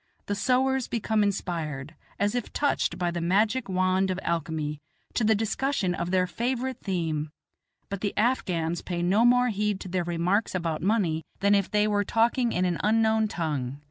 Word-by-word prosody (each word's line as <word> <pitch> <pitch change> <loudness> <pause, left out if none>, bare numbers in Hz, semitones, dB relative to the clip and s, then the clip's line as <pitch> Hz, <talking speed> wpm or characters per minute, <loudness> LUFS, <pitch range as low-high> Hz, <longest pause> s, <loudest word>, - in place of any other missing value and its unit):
The 205 - -2
sowars 260 +4 +1
become 220 -1 0
inspired, 165 -8 -2 0.2
as 205 0 +1
if 245 -2 -3
touched 290 -1 0
by 175 -1 0
the 170 0 -3
magic 210 +7 +1
wand 185 +1 +2
of 185 0 -1
alchemy, 160 -3 -2 0.3
to 240 - 0
the 220 0 +4
discussion 220 -2 0
of 170 0 -3
their 185 0 +2
favorite 255 +6 -2
theme; 160 -6 -2 0.6
but 200 -1 -5
the 205 - -2
Afghans 175 -8 0
pay 175 -1 -3
no 195 +6 +3
more 245 +1 +5
heed 210 -2 -1
to - - -6
their 180 0 -1
remarks 175 +5 0
about 165 -3 -2
money 185 -6 +1 0.2
than 200 +1 +4
if 200 -2 +2
they 210 0 +2
were 205 -1 +1
talking 235 +3 +2
in 180 +1 +1
an 175 -2 -1
unknown 220 0 +3
tongue. 145 -8 -3
195 Hz, 175 wpm, -27 LUFS, 170-220 Hz, 0.6 s, more